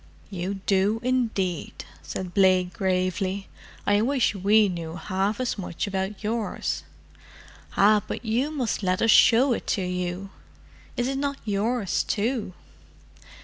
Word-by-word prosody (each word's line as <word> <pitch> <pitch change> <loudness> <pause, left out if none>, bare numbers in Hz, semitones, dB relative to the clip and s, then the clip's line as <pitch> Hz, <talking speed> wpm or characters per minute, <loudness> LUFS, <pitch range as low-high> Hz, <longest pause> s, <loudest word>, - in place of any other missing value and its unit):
"You 190 +1 -3
do, 200 +3 +2
indeed," 225 -9 -1 0.2
said 185 -2 -6
Blake 185 -2 +3
gravely. 185 +1 -1 0.4
"I 205 0 +3
wish 260 0 +2
we 205 +2 +4
knew 170 -3 -5
half 195 +4 -1
as 250 -4 -2
much 180 -1 -3
about 195 +1 -3
yours." 220 0 -2 1.0
"Ah, 210 +1 +5
but - - -5
you 240 +6 +1
must 260 -10 -2
let 185 0 0
us 225 - +5
show 245 +5 +6
it - - -5
to 190 - -1
you. 180 +1 -3 0.7
Is 245 - +1
it 270 0 -2
not 280 0 -1
yours, 210 -1 0
too? 220 -2 -1
200 Hz, 135 wpm, -25 LUFS, 185-230 Hz, 1.0 s, show